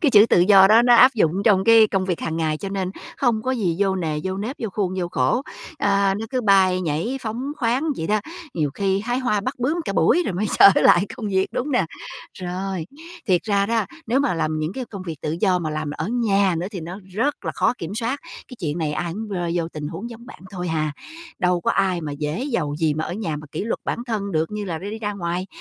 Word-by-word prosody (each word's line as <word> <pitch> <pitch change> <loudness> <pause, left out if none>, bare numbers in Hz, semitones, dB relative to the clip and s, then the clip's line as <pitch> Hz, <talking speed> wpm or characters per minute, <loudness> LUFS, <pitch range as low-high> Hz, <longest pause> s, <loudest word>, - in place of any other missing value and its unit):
Cái 300 -7 +3
chữ 210 0 +7
tự 175 - +4
do 190 +1 +7
đó 225 +2 +6
nó 240 0 +6
áp 255 +3 +7
dụng 165 -8 +2
trong 190 -3 +4
cái 225 -1 +7
công 195 -2 -1
việc 180 -3 -2
hàng 160 0 -3
ngày, 155 -2 0
cho 195 - -6
nên 190 -2 -2 0.3
không 235 -5 +1
có 260 - -1
gì 195 -10 0
vô 195 -1 +2
nề, 155 -4 -2
vô 190 0 -2
nếp, 225 +8 -4
vô 225 - -3
khuôn, 185 -2 -2
vô 175 - -2
khổ. 250 +7 +1 0.4
Ờ, 200 -1 +2
nó 225 - -5
cứ 255 -1 0
bay 190 -4 +4
nhảy 175 - -2
phóng 245 +5 -4
khoáng 250 +4 0
vậy 160 - -3
đó, 215 0 +1 0.3
nhiều 150 -4 0
khi 195 -1 0
hái 245 +4 -1
hoa 240 -6 0
bắt 260 +6 -3
bướm 290 +8 0
cả - - -2
buổi 355 - +3
rồi - - -2
mới 210 +4 -1
trở 200 - +10
lại 185 +4 +5
công 220 - -5
việc, 190 -1 +1
đúng 280 +4 -2
nè? 250 -9 +2 0.5
Rồi, 185 -1 -4 0.4
thiệt 180 -3 +2
ra 200 -2 +1
đó, 225 -2 +1 0.2
nếu 255 +5 +2
mà 280 -10 +1
làm 155 -1 -1
những 155 +3 -2
cái 255 +3 -4
công 200 -4 -8
việc 165 -3 -6
tự 155 +2 -2
do 185 -3 +3
mà 155 -3 -3
làm 155 -1 -3
ở - - -3
nhà 200 -6 +2
nữa 175 - -3
thì 190 -5 -6
nó 175 +5 -7 0.2
rất 280 +7 -1
là - - -2
khó - - +2
kiểm 170 +4 -5
soát. 240 +5 -2 0.3
Cái 250 - -10
chuyện 155 -2 -2
này 155 -3 -1
ai 170 +2 -3
cũng 215 +3 -6
rơi 175 -4 -2
vô 170 -1 -1
tình 150 -2 -6
huống 185 +9 -6
giống 235 +1 -11
bạn - - -12
thôi 180 -3 -4
hà. 155 -2 -1 0.5
Đâu 180 -1 +1
có - - 0
ai 190 -3 +1
mà 150 -3 -5
dễ 150 - -3
dầu 165 - -2
gì 160 -2 +1
mà 155 +1 -2
ở - - -5
nhà 175 -7 -3
mà 150 0 -9
kỷ 160 - -3
luật 225 - -2
bản - - -2
thân 205 -4 -3
được 160 0 0
như 210 -1 -4
là 170 -4 -4
đi 200 +5 -6
đi 220 - -5
ra 210 -2 -3
ngoài. 180 -1 -3
195 Hz, 260 wpm, -22 LUFS, 170-225 Hz, 0.5 s, trở